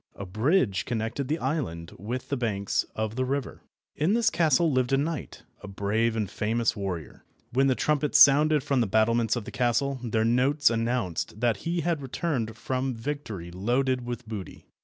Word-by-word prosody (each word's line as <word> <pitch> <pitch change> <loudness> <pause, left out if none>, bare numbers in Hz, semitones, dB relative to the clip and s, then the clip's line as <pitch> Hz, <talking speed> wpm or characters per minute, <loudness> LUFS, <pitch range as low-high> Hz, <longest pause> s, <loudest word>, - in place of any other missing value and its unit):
A 100 - -6
bridge 110 - +1
connected 120 +3 -2
the 155 +4 0
island 125 - -3
with 120 +7 -5
the 140 - 0
banks 105 -6 -1
of 110 0 -2
the 130 - 0
river. 135 0 -3 0.3
In 160 +7 +1
this 230 -1 +3
castle 160 0 +3
lived 130 -1 +1
a - - +5
knight, 150 0 -3 0.2
a 105 - -9
brave 105 +4 0
and 110 -3 -1
famous 115 +4 0
warrior. 95 - -5 0.3
When 135 +2 +3
the 130 - +3
trumpets 150 0 +1
sounded 150 +1 +6
from 135 -3 +1
the 115 - +1
battlements 115 +3 +2
of 120 -4 -4
the - - -7
castle, 130 +2 0
their 110 -2 0
notes 130 +4 +3
announced 115 -5 -2
that 120 -4 +2
he 170 - -2
had 165 -2 -1
returned 130 -5 -3
from 130 +1 -2
victory 115 -9 -5
loaded 125 +7 0
with 120 -1 -6
booty. 105 -4 -7
120 Hz, 180 wpm, -27 LUFS, 110-140 Hz, 0.3 s, sounded